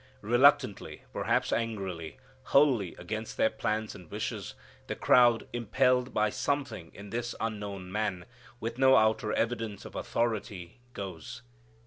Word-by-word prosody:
Reluctantly, 120 -2 +3
perhaps - - +1
angrily, 95 -8 -3 0.3
wholly 130 - +3
against 110 +5 -5
their 110 - +3
plans 110 0 -2
and 90 -4 -13
wishes, - - -4 0.3
the - - -3
crowd, 120 -2 +4
impelled 125 +2 +2
by 105 -1 +2
something 120 - -2
in 100 0 -10
this 120 0 -3
unknown 100 -4 -4
Man, 100 -4 -2 0.3
with 115 +2 -4
no 130 0 +6
outer 110 +1 +2
evidence 115 -3 -2
of - - -9
authority, 110 -5 -3
goes. 100 +5 -7
110 Hz, 125 wpm, -30 LUFS, 100-120 Hz, 0.3 s, no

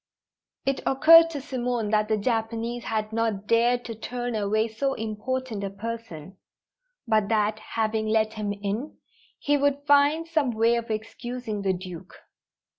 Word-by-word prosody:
It 275 0 0
occurred 330 +4 +7
to 305 -3 -5
Simone 245 -5 -2
that 215 -1 +2
the 215 0 +1
Japanese 230 +2 -2
had 220 -2 -2
not 220 -3 -1
dared 240 +2 +2
to 230 - -5
turn 245 +2 -4
away 215 +1 +1
so 270 +5 -2
important 225 +1 -3
a 195 - -2
person, 200 -5 -7 0.7
but 215 -2 +2
that, 215 -1 +1
having 220 0 -2
let 220 0 +1
him 210 -2 -3
in, 205 +8 -4 0.4
he 290 0 +1
would 285 0 0
find 290 +3 +4
some 310 -5 +1
way 230 +2 +3
of 235 -1 -2
excusing 220 0 -4
the 195 -1 +1
Duke. 180 -1 -8
225 Hz, 150 wpm, -26 LUFS, 215-250 Hz, 0.7 s, occurred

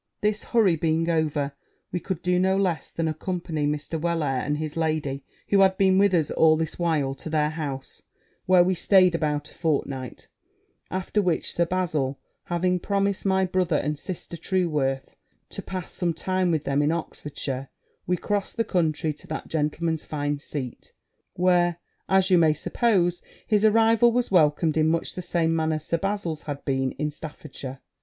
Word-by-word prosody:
This 210 +1 0
hurry 215 -8 +3
being 165 +1 0
over, 150 -3 0 0.4
we 180 - -1
could 180 -1 -4
do 180 0 +2
no 190 +1 +2
less 180 -7 -1
than 165 -1 -1
accompany 160 -1 -2
Mr. 150 +2 -3
Wellair 155 -6 0
and 150 0 -1
his 155 -1 -4
lady, 155 -4 -1 0.3
who 200 - +4
had 190 -1 +4
been 190 -1 +4
with 200 -1 +4
us 160 -4 +1
all 160 -1 +4
this 160 +1 -3
while, 155 -6 +1
to 140 +4 -8
their 150 -1 +1
house, 140 -4 -5 0.5
where 185 -1 +6
we 185 +1 +2
staid 185 0 +5
about 150 -3 -1
a - - -17
fortnight; 140 -5 -2 0.6
after 190 +3 -1
which, 180 -4 -1
Sir 170 0 +1
Bazil 155 -7 -1 0.3
having 180 +1 0
promised 200 +1 -1
my 190 0 +3
brother 180 -3 0
and 150 +1 -1
sister 170 +2 -6
Trueworth 150 -7 -1 0.3
to - - -6
pass 185 -3 -6
some 170 -3 -1
time 185 +1 0
with 160 -3 0
them 140 0 +1
in 145 +1 +2
Oxfordshire, 140 -5 -4 0.4
we 180 +1 +1
crossed 205 +4 -2
the 230 - +2
country 160 -6 0
to - - -13
that 155 - -5
gentleman's 160 +1 -1
fine 145 -1 -2
seat; 135 -4 -6 0.4
where, 175 -1 +2 0.5
you 185 -2 +5
may 155 -2 +4
suppose, 175 - +1 0.2
his 210 -2 +2
arrival 225 +2 +5
was 245 -1 0
welcomed 155 -2 +3
in 155 0 +3
much 165 +1 0
the 180 - -5
same 165 -2 0
manner 160 -1 +1
Sir 155 +2 -1
Bazil's 195 -5 -2
had 140 -1 -5
been 135 -2 0
in 150 +1 -2
Staffordshire. 145 -3 -8
165 Hz, 170 wpm, -25 LUFS, 150-185 Hz, 0.6 s, where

